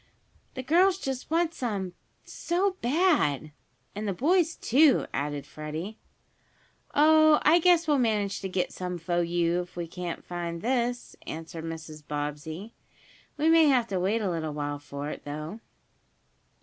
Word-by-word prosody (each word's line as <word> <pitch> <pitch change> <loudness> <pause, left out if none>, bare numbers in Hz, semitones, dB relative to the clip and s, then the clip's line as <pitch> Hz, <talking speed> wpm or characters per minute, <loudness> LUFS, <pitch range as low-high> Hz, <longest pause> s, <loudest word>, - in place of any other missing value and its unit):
"The 260 - -4
girls 360 +7 +4
just 265 -8 -4
want 330 +1 +1
some 200 - -3 0.3
so 375 +3 -1
bad!" 245 - +2 0.4
"And 210 +1 -4
the 200 - 0
boys, 335 - +2
too," 280 +4 +4
added 145 0 -3
Freddie. 155 +8 -6 1.0
"Oh, 310 +1 +6
I 325 +3 +6
guess 340 -1 +4
we'll 295 -2 +3
manage 210 -5 0
to 190 - -4
get 185 -1 -1
some 180 -1 -4
fo 175 +1 -1
you, 170 0 +1
if 180 0 -11
we 175 -1 -3
can't 175 +1 -6
find 170 -1 -5
this," 245 0 -1
answered 160 0 -6
Mrs. 160 -1 -7
Bobbsey. 150 +7 -5 0.6
"We 300 +2 +1
may 325 0 +6
have 255 -4 +4
to 190 -2 -1
wait 210 +5 0
a 190 - 0
little 160 -3 -3
while 145 -1 -3
for 145 0 -6
it, - - -8
though." 155 +8 -6
195 Hz, 150 wpm, -27 LUFS, -, 1.0 s, Oh